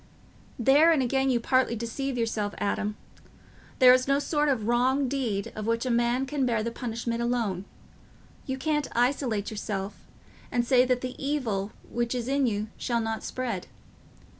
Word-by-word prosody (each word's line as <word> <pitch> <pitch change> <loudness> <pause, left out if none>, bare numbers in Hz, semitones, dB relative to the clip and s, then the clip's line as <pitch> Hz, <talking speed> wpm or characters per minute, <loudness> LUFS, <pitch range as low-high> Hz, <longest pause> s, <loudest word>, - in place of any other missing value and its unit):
"There 285 +7 +5
again 270 -2 +2
you 245 -2 +2
partly 255 0 +2
deceive 245 +4 -3
yourself, 220 -3 -1
Adam. 210 +1 -1 0.8
There 250 -2 +8
is 255 0 +2
no 275 0 +3
sort 295 +1 +1
of 225 -6 0
wrong 260 +3 +2
deed 240 -7 -2
of 215 0 -4
which 230 +2 0
a 255 - 0
man 240 +2 +2
can 280 0 -2
bear 230 -4 +1
the 235 - -2
punishment 235 0 -3
alone; 230 -6 -1 0.8
you 265 -1 -2
can't 295 +2 0
isolate 240 -4 0
yourself 205 -2 -4 0.6
and 240 -1 +1
say 250 0 +5
that 250 -1 +1
the 255 +1 -6
evil 225 -9 -1 0.2
which 240 +1 -2
is 240 -1 -3
in 275 -1 +2
you 215 -1 -2
shall 235 -2 -1
not 225 -1 -2
spread. 235 -8 -3
240 Hz, 165 wpm, -27 LUFS, 225-265 Hz, 0.8 s, There